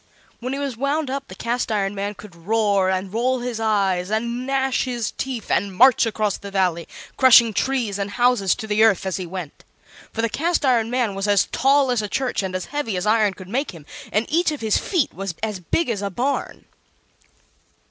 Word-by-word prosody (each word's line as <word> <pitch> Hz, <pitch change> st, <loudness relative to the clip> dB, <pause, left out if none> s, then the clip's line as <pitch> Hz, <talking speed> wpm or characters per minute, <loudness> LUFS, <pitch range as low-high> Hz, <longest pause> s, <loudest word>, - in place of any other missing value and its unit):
When 255 Hz, +2 st, -4 dB
he -, -, -3 dB
was 280 Hz, -3 st, -3 dB
wound 280 Hz, +3 st, -1 dB
up 275 Hz, 0 st, -4 dB
the 185 Hz, -, -10 dB
Cast 235 Hz, +2 st, -2 dB
iron 200 Hz, -2 st, 0 dB
Man 200 Hz, +1 st, -4 dB
could 200 Hz, -2 st, -13 dB
roar, 200 Hz, +1 st, +1 dB
and 190 Hz, +1 st, -2 dB
roll 250 Hz, +2 st, 0 dB
his 240 Hz, -2 st, -4 dB
eyes, 195 Hz, -4 st, +1 dB
and 235 Hz, +4 st, -2 dB
gnash 270 Hz, -1 st, 0 dB
his 240 Hz, -3 st, -3 dB
teeth 255 Hz, -5 st, -5 dB
and 200 Hz, -2 st, 0 dB
march 250 Hz, +1 st, +5 dB
across 215 Hz, -2 st, -1 dB
the 200 Hz, -, -8 dB
Valley, 180 Hz, -4 st, 0 dB, 0.3 s
crushing 235 Hz, -4 st, +7 dB
trees 230 Hz, -4 st, -1 dB
and 200 Hz, 0 st, -2 dB
houses 240 Hz, -4 st, +2 dB
to 225 Hz, -, -7 dB
the 215 Hz, 0 st, +2 dB
earth 200 Hz, -4 st, +3 dB
as 190 Hz, -, -2 dB
he 185 Hz, -2 st, -5 dB
went. 175 Hz, -4 st, -7 dB, 0.5 s
For 225 Hz, -, -3 dB
the -, -, +3 dB
Cast 325 Hz, +7 st, 0 dB
iron 235 Hz, -4 st, +2 dB
Man 245 Hz, -4 st, 0 dB
was 195 Hz, +1 st, -3 dB
as 205 Hz, -1 st, +3 dB
tall 270 Hz, 0 st, +3 dB
as 240 Hz, -3 st, +1 dB
a 210 Hz, -, -4 dB
church 260 Hz, -1 st, -1 dB
and 190 Hz, -1 st, -4 dB
as 185 Hz, -, -3 dB
heavy 285 Hz, -10 st, -2 dB
as 180 Hz, -, -2 dB
iron 215 Hz, -2 st, +2 dB
could 185 Hz, -, -11 dB
make 265 Hz, +2 st, -2 dB
him, 155 Hz, -3 st, -13 dB, 0.3 s
and 215 Hz, +2 st, +1 dB
each 335 Hz, +2 st, +1 dB
of 295 Hz, -, -6 dB
his 220 Hz, -2 st, +2 dB
feet 345 Hz, -9 st, 0 dB
was 195 Hz, -3 st, -5 dB
as 210 Hz, -3 st, -2 dB
big 315 Hz, -, -1 dB
as 220 Hz, -5 st, -2 dB
a 200 Hz, -, -2 dB
barn. 255 Hz, +9 st, -3 dB
220 Hz, 215 wpm, -22 LUFS, 195-255 Hz, 0.5 s, crushing